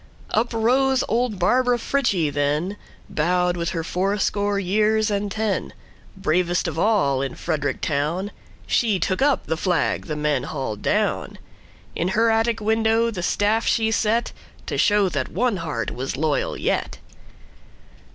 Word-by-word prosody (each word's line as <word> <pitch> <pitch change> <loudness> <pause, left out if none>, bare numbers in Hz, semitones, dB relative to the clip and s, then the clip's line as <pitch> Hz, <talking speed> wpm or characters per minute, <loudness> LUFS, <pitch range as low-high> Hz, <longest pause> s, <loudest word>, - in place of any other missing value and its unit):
Up 230 +2 +1
rose 255 +3 +2
old 235 -2 0
Barbara 245 +7 +2
Frietchie 215 - 0
then, 150 +7 0 0.3
Bowed 180 +3 +1
with 170 -1 -2
her 165 -2 -3
fourscore 200 +3 0
years 215 +3 +1
and 205 0 -1
ten; 215 -2 -2 0.4
Bravest 175 -1 +1
of 160 -1 -3
all 170 -11 +2
in 135 -2 -3
Frederick 150 -4 -2
town, 160 +7 -1 0.3
She 220 -5 +2
took 185 +4 -1
up 285 0 +2
the 160 - -1
flag 180 0 0
the 155 - -3
men 150 -3 0
hauled 130 -8 -4
down; - - 0 0.6
In 170 - -1
her 225 0 +4
attic 225 0 +1
window 225 +1 +2
the 185 -5 -5
staff 210 +5 +1
she 220 -1 +2
set, 225 +2 +1 0.3
To - - -3
show 205 -1 +3
that 145 -6 -2
one 230 +3 0
heart 150 -10 -3
was 130 +1 -4
loyal 150 -1 0
yet. - - -1
195 Hz, 145 wpm, -23 LUFS, 160-225 Hz, 0.6 s, her